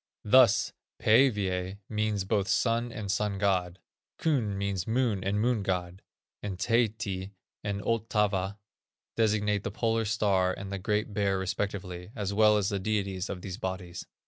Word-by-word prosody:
Thus, 120 0 +5 0.3
Pæivæ 100 -6 +3
means 105 -2 -1
both 100 0 0
sun 115 +4 +1
and 105 -4 -4
sun 105 -1 0
god; 95 -3 +1 0.4
Kun 120 -11 0
means 100 -2 -2
moon 115 -5 +1
and 100 +2 0
moon 120 0 +2
god; 90 -1 -2 0.4
and 100 -3 -4
Taehti 105 -3 0 0.3
and 100 -1 -3
Ottava 105 -4 0 0.6
designate 105 -2 +1
the - - -2
Polar 115 -1 0
star 100 -4 +2
and 100 0 -7
the 100 - -3
Great 105 +2 -1
Bear 100 -2 +1
respectively, 95 -1 -3
as 100 -2 -2
well 105 0 +5
as 100 -1 +1
the 100 -2 -1
deities 95 -2 -1
of 90 -2 -5
these 95 +1 -6
bodies. 90 -2 -5
100 Hz, 145 wpm, -29 LUFS, 95-110 Hz, 0.6 s, Thus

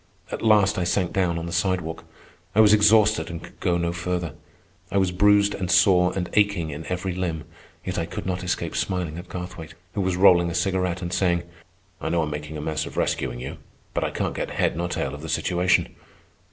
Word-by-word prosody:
At - - -4
last 105 -2 +4
I - - 0
sank 90 0 0
down 90 -3 +1
on 85 - -4
the 85 - -5
sidewalk. 85 -1 -1 0.5
I - - +3
was 105 -1 +7
exhausted 110 +1 +4
and 85 -1 -7
could - - -14
go 85 -1 +1
no 85 0 -1
farther. 85 -2 -3 0.6
I 100 - 0
was 95 -2 +2
bruised 100 +2 +4
and 90 -2 -4
sore 90 0 +5
and 90 -2 -2
aching 100 -7 +2
in 75 +2 -7
every 90 0 -2
limb; 85 -4 -3 0.4
yet 95 -1 -2
I 80 - -2
could - - -6
not 95 0 -2
escape 90 - -2
smiling 85 -3 -2
at 90 - -11
Garthwaite, 90 -3 -7 0.2
who 100 - -1
was 95 -1 0
rolling 90 -2 +6
a 85 - -4
cigarette 90 0 0
and 85 +1 -4
saying: 85 -3 +1 0.6
"I 80 - -2
know 85 0 +1
I'm 75 - -3
making 75 +1 -5
a - - -5
mess 80 0 -2
of - - -10
rescuing - - -1
you, 65 - -6 0.4
but - - 0
I - - 0
can't - - -2
get - - -3
head - - 0
nor 85 +1 -2
tail 65 - -2
of 75 - -8
the 80 - -7
situation. 90 +2 +1
90 Hz, 220 wpm, -24 LUFS, 85-95 Hz, 0.6 s, was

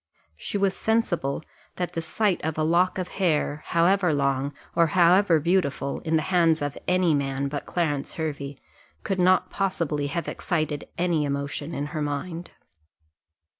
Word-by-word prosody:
She 145 - -4
was 195 -1 +1
sensible 175 -11 0 0.3
that 175 -1 -3
the 165 - -2
sight 185 +4 0
of 160 0 -2
a 155 - +1
lock 175 +4 +2
of 185 -1 -3
hair, 155 -4 +1
however 175 +1 +3
long, 140 0 0 0.2
or 170 0 +4
however 180 -1 +5
beautiful, 145 -5 0
in 160 0 -1
the 155 - +2
hands 165 -3 +4
of 145 -1 -3
any 180 -2 +3
man 140 -1 -1
but 145 0 -5
Clarence 150 -5 -1
Hervey, 145 -3 -4 0.5
could 195 -2 -2
not 185 +1 +3
possibly 165 -7 -1
have 170 +3 -3
excited 155 -4 -2
any 170 -3 +1
emotion 140 +2 -3
in 140 - -2
her 155 - -2
mind. 165 +4 -4
165 Hz, 155 wpm, -25 LUFS, 145-180 Hz, 0.5 s, however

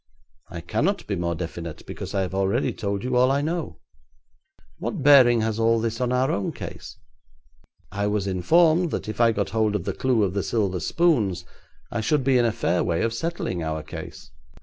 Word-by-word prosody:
'I 85 - -7
cannot 110 - -1
be 100 - -2
more 85 -1 -2
definite, 85 -1 -7
because - - -7
I 100 - +2
have 95 0 -3
already 95 0 0
told 100 -1 -3
you 125 0 -1
all 125 +1 +4
I 140 +1 +1
know.' 155 - -3 1.0
'What - - -4
bearing 125 -5 +7
has 110 0 -1
all 115 0 +3
this 115 +1 -2
on 125 -1 0
our 125 +1 +1
own 100 - -2
case?' - - -9 0.9
'I 100 +1 -1
was 105 -1 -1
informed 160 - +3
that - - -4
if 110 +2 -3
I 115 -1 +5
got 100 -3 -2
hold 110 -2 +1
of 100 - -2
the - - -3
clue 125 -5 +1
of 95 -2 0
the 100 - 0
silver 95 -4 -1
spoons 100 - +1 0.5
I 115 - -2
should 135 +5 +1
be 130 -1 +3
in 120 - +3
a 115 - +2
fair 90 -4 0
way 85 -1 0
of 115 0 0
settling 165 - -3
our 80 -1 -3
case.' - - -9
110 Hz, 200 wpm, -24 LUFS, 95-125 Hz, 1.0 s, bearing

